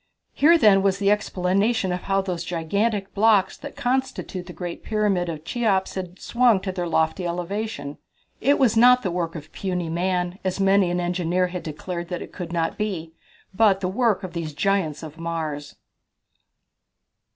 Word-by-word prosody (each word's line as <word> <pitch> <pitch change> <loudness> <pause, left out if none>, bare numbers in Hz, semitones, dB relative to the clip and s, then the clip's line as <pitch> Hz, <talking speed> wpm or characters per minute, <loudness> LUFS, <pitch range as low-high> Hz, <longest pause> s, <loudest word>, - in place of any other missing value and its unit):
Here, 330 +4 +5
then, 205 -9 +5
was 195 -1 +2
the 200 0 +2
explanation 200 0 +1
of 180 0 -2
how 195 0 +1
those 180 -3 -3
gigantic 195 +4 -1
blocks 210 -2 +3
that 285 - -9
constitute 255 -7 -2
the - - -7
great 175 -2 -6
Pyramid 205 -5 0
of 155 -1 -6
Cheops 200 -5 0
had 180 -2 -5
been - - -22
swung 235 -4 +3
to 190 - -3
their 180 -2 -3
lofty 160 +2 0
elevation. 175 -3 -4 0.4
It 280 +4 +3
was 240 -5 +3
not 250 +2 +6
the 185 - -1
work 170 -1 -2
of 155 -2 -9
puny 180 -3 -3
man, 180 +2 -1
as 185 0 -2
many 195 -1 +4
an 175 0 -1
engineer 180 +1 0
had 180 0 -5
declared 170 +2 -5
that 180 -1 -4
it - - -13
could 175 -3 -6
not 165 +2 -1
be, 175 -6 -3 0.4
but 200 -1 +4
the 185 - -1
work 215 0 +1
of 185 -2 -6
these 160 -4 -4
giants 175 -4 0
of 160 0 -9
Mars. 160 -3 -4
185 Hz, 175 wpm, -24 LUFS, 170-210 Hz, 0.4 s, not